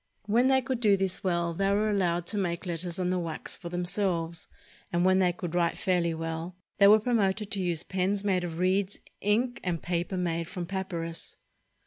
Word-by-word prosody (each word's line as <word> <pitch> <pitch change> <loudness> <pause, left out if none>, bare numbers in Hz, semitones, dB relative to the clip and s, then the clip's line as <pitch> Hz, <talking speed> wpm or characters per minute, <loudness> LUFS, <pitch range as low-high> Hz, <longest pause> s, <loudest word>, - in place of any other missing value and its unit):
When 235 +5 +3
they 265 -1 +4
could 255 -1 -2
do 210 -4 +4
this 190 -1 -1
well, 170 -2 0
they 195 +3 +1
were 210 +2 +2
allowed 175 -4 +1
to 210 - -1
make 170 -2 -2
letters 175 0 -3
on 180 0 0
the 185 - +1
wax 165 -2 -4
for 170 - -8
themselves; 175 -2 -1 0.4
and 175 +1 +2
when 185 0 +5
they 180 -2 +4
could 175 -1 -6
write 170 -1 +1
fairly 175 -3 +1
well, 165 +2 -4 0.2
they 200 - +8
were 215 +2 +8
promoted 210 -3 0
to 195 - -1
use 175 -2 -1
pens 195 +2 -1
made 190 -3 +1
of 165 -2 -4
reeds, 190 +2 +1 0.2
ink, 235 +5 +1
and 175 -3 -2
paper 175 +2 -1
made 170 -2 -1
from 180 0 -5
papynis. 170 -3 -4
180 Hz, 195 wpm, -28 LUFS, 170-200 Hz, 0.4 s, they